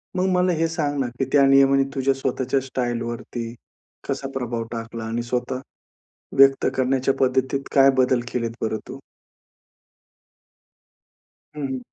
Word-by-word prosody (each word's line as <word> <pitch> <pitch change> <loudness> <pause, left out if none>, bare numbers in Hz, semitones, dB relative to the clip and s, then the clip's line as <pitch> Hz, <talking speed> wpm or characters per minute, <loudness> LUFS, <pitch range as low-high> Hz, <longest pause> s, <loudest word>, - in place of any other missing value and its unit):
मग 185 0 +1
मला 180 0 +3
हे 165 +1 +2
सांग 150 -3 -2
ना, 130 - 0
की 135 - +1
त्या 140 -1 +5
नियमाने 135 0 +5
तुझ्या 135 0 +2
स्वतःच्या 135 0 -1
स्टाईलवरती 120 -2 -4 0.5
कसा 135 0 -2
प्रभाव 120 -3 -3
टाकला? 115 0 -6
आणि 115 +1 -2
स्वतः 125 +1 -2 0.8
व्यक्त 135 0 +5
करण्याच्या 130 +1 +1
पद्धतीत 130 +1 +1
काय 135 0 +6
बदल 130 -1 +3
केलेत 115 -2 -1
बरं 110 0 -1
तू? 135 - -7 2.6
हं, 150 - -6
हं. 130 -1 -3
130 Hz, 130 wpm, -23 LUFS, 120-135 Hz, 2.6 s, काय